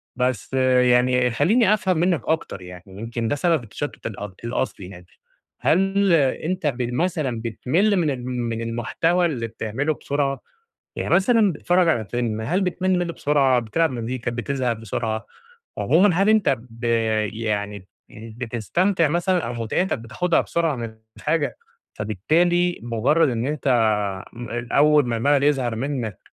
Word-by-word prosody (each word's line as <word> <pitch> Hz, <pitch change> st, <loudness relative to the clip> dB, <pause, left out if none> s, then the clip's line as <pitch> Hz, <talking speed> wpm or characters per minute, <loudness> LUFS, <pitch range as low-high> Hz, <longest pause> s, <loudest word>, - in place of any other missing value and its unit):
بس 125 Hz, -2 st, -1 dB
يعني 125 Hz, -1 st, +3 dB
خلّيني 205 Hz, -, +3 dB
أفهم 190 Hz, -4 st, +1 dB
منك 170 Hz, -3 st, +2 dB
أكتر 160 Hz, -11 st, -2 dB
يعني 90 Hz, -1 st, -10 dB
يمكن 115 Hz, +4 st, -5 dB
ده 130 Hz, -, 0 dB
سبب 160 Hz, -2 st, +1 dB
التشتُّت 130 Hz, +6 st, -7 dB
الأ 105 Hz, -2 st, -6 dB
الأصلي 115 Hz, -5 st, -3 dB
يعني، 90 Hz, -2 st, -12 dB, 0.6 s
هل 195 Hz, +2 st, +3 dB
أنت 160 Hz, +3 st, +1 dB
ب 130 Hz, -3 st, -1 dB
مثلًا 150 Hz, -6 st, -1 dB
بتمِلّ 155 Hz, -, +1 dB
من 165 Hz, -4 st, +1 dB
ال 125 Hz, -2 st, -5 dB
من 120 Hz, -2 st, -3 dB
المحتوى 130 Hz, +10 st, 0 dB
اللي 125 Hz, -9 st, -2 dB
بتعملُه 115 Hz, +7 st, -2 dB
بسرعة؟ 140 Hz, -1 st, -2 dB, 0.5 s
يعني -, -, +1 dB
مثلًا 210 Hz, +2 st, +4 dB
بتتفرّج 175 Hz, +4 st, +2 dB
على 115 Hz, -9 st, +1 dB
فيلم، 115 Hz, 0 st, -2 dB
هل 175 Hz, -, 0 dB
بتمِلّ 185 Hz, 0 st, 0 dB
منه 175 Hz, -1 st, -2 dB
بسرعة، 140 Hz, -5 st, +2 dB
بتلعب 145 Hz, +8 st, 0 dB
مزيكا 120 Hz, 0 st, -3 dB
بتزهق 125 Hz, +1 st, -1 dB
بسرعة؟ 110 Hz, 0 st, -4 dB, 0.5 s
عمومًا 180 Hz, +1 st, +3 dB
هل 195 Hz, +4 st, +3 dB
أنت 215 Hz, -3 st, +4 dB
ب 115 Hz, 0 st, -15 dB, 0.5 s
يعني 105 Hz, -3 st, -3 dB, 0.2 s
بتستمتع 120 Hz, -, -1 dB
مثلًا 175 Hz, +4 st, +1 dB
أو 120 Hz, -, -4 dB
مُتعتك 120 Hz, -, -1 dB
بتاخدها 165 Hz, +10 st, 0 dB
بسرعة 165 Hz, -3 st, -1 dB
من 115 Hz, -2 st, -6 dB, 0.2 s
الحاجة، 155 Hz, -1 st, -1 dB, 0.4 s
فبالتالي 170 Hz, -, +1 dB
مجرّد 130 Hz, +7 st, +2 dB
إن 120 Hz, -1 st, -2 dB
أنت 150 Hz, 0 st, -3 dB
آآ، 115 Hz, +1 st, -1 dB
أول 150 Hz, 0 st, +5 dB
ما 115 Hz, -1 st, -1 dB
المَلَل 140 Hz, +4 st, +2 dB
يظهر 130 Hz, -5 st, +1 dB
منك، 120 Hz, -5 st, -3 dB
130 Hz, 140 wpm, -23 LUFS, 115-165 Hz, 0.6 s, أول